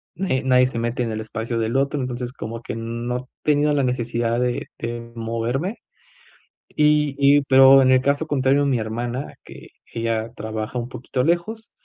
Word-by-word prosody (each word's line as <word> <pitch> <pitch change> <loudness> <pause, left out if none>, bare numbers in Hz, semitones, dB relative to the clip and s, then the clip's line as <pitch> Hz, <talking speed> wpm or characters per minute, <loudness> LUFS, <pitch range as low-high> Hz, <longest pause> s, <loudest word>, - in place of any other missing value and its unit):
nadie 150 -8 -1
nadie 125 -1 +4
se 125 -2 -3
mete 120 +1 -1
en 115 - -3
el 110 - -3
espacio 115 +1 -4
del 115 +3 0
otro, 140 +1 0
entonces, 125 -1 -4
como 115 -2 -6
que - - -5
no 120 +2 -4
tenido 150 0 +2
la 140 - +2
necesidad 120 -2 -1
de 125 0 -2
de 120 0 -4
moverme, 115 - -3 0.9
y 150 -1 +2
y, 140 +1 +5
pero, 135 0 +7
en 130 - +4
el 130 - +5
caso 140 +3 0
contrario, 140 -1 +2
mi 130 -4 +1
hermana, 120 +5 -4
que - - -12 0.3
ella 115 0 -2
trabaja 110 +2 -4
un 120 - -5
poquito 125 +1 -3
lejos, 205 +7 -1
125 Hz, 170 wpm, -22 LUFS, 115-140 Hz, 0.9 s, pero